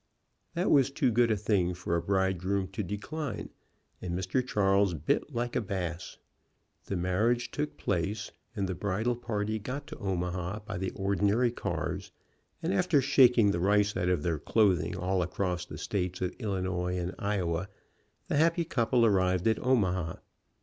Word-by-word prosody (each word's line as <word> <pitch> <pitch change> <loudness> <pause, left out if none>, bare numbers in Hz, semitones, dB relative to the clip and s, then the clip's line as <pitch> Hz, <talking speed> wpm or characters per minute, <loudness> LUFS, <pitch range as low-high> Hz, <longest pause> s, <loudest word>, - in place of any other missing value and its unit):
That 175 +3 +1
was 140 -2 +5
too 135 -2 +1
good 120 +1 +3
a 110 - +2
thing 95 -4 +1
for 85 -1 -2
a 85 - +1
bridegroom 95 0 0
to 110 - -4
decline, 110 - -4 0.5
and 90 -1 -3
Mr. 95 +8 0
Charles 100 -5 +2
bit 80 - 0
like 120 -1 -2
a - - +2
bass. 90 -4 -4 0.7
The 100 - -2
marriage 105 +7 +1
took 150 0 -3
place, 100 +5 -2 0.2
and 100 -3 -1
the 95 - -2
bridal 105 +6 -1
party 110 -2 -2
got 135 +7 -5
to - - -9
Omaha 90 0 -2
by 90 - -4
the 95 0 -1
ordinary 100 +5 +2
cars, - - -3 0.5
and - - 0
after 145 - +3
shaking 125 -5 +5
the 85 - -1
rice 105 +3 +3
out 90 - 0
of 90 -5 +1
their 80 -3 0
clothing 90 -2 +2
all 90 +1 0
across 90 0 -2
the - - -8
states 90 -2 -2
of 90 -1 -2
Illinois 95 -4 -1
and 90 +1 -3
Iowa, 95 -3 -1 0.6
the - - 0
happy 165 +2 +3
couple 120 -4 +2
arrived 95 -2 +2
at 110 - +2
Omaha. 95 -10 +1
100 Hz, 165 wpm, -30 LUFS, 90-115 Hz, 0.7 s, was